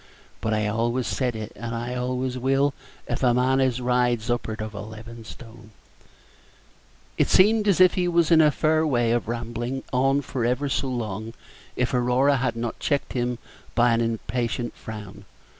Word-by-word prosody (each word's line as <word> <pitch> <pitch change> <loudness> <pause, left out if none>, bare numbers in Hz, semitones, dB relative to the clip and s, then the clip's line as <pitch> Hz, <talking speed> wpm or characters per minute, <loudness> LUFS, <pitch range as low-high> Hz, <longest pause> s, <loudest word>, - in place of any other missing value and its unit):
But 110 - -1
I 105 0 0
always 120 +3 0
said 125 -3 -1
it, 110 0 -6
and 115 0 -5
I 120 +2 -3
always 125 +1 -2
will, 135 +2 +1 0.3
if - - -3
a 125 -2 +3
man 130 +2 +2
as 130 -2 +1
rides 125 -2 +1
up'ard 110 -2 -2
of 110 0 -5
eleven 110 +3 -9
stone 115 -1 -12 0.8
" - - -32
It - - +3
seemed 210 +2 +5
as 195 -3 +3
if 185 -1 +7
he 180 -1 0
were 170 -1 +4
in 160 -1 +7
a 155 - +6
fair 155 +2 +2
way 120 -5 +2
of 120 -2 0
rambling 120 +2 -4
on 135 +2 +2
for 130 -2 -3
ever 125 +4 0
so 135 - -1
long 110 -3 -4 0.4
if 125 0 -1
Aurora 125 +3 +3
had 125 -2 -1
not 115 0 -4
checked 145 -2 -1
him 125 -1 -1 0.4
by 120 0 +4
an 115 - +2
impatient 115 +1 -2
frown. 105 -1 -9
120 Hz, 175 wpm, -24 LUFS, 115-135 Hz, 0.8 s, if